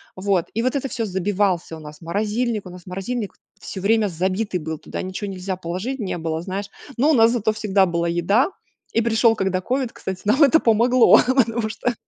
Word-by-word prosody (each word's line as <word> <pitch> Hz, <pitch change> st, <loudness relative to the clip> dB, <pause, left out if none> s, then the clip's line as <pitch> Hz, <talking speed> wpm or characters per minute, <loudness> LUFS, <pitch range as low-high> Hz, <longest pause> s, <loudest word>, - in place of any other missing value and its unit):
Вот, 190 Hz, -2 st, 0 dB
и 225 Hz, -, -1 dB
вот 255 Hz, +3 st, 0 dB
это 270 Hz, 0 st, -1 dB
всё 230 Hz, -3 st, -2 dB
забивался 190 Hz, -3 st, -1 dB
у -, -, -11 dB
нас 150 Hz, +1 st, -11 dB
морозильник, 210 Hz, +5 st, -1 dB
у -, -, -8 dB
нас 180 Hz, -1 st, -12 dB
морозильник 195 Hz, +4 st, -4 dB, 0.3 s
всё 190 Hz, -, -7 dB
время 215 Hz, +1 st, +3 dB
забитый 185 Hz, +2 st, -1 dB
был, 160 Hz, 0 st, -5 dB
туда -, -, -6 dB
ничего 190 Hz, +2 st, -5 dB
нельзя 185 Hz, 0 st, -4 dB
положить 185 Hz, +10 st, -4 dB
не 190 Hz, -4 st, -3 dB
было, 160 Hz, 0 st, -3 dB
знаешь, 195 Hz, +2 st, -4 dB, 0.3 s
но 285 Hz, +6 st, +3 dB
у -, -, +4 dB
нас 225 Hz, -2 st, +5 dB
зато 220 Hz, -3 st, +1 dB
всегда 205 Hz, -3 st, +2 dB
была 170 Hz, 0 st, -1 dB
еда. 200 Hz, -, +2 dB, 0.4 s
И 230 Hz, -, +3 dB
пришел 225 Hz, 0 st, +3 dB
когда 190 Hz, -2 st, -1 dB
ковид, 255 Hz, +2 st, -1 dB
кстати, 190 Hz, -1 st, -6 dB
нам 260 Hz, +9 st, +4 dB
это 305 Hz, +4 st, +6 dB
помогло, 235 Hz, +2 st, +5 dB
потому 235 Hz, -4 st, +2 dB
что 240 Hz, +3 st, -2 dB
205 Hz, 200 wpm, -22 LUFS, 185-230 Hz, 0.4 s, это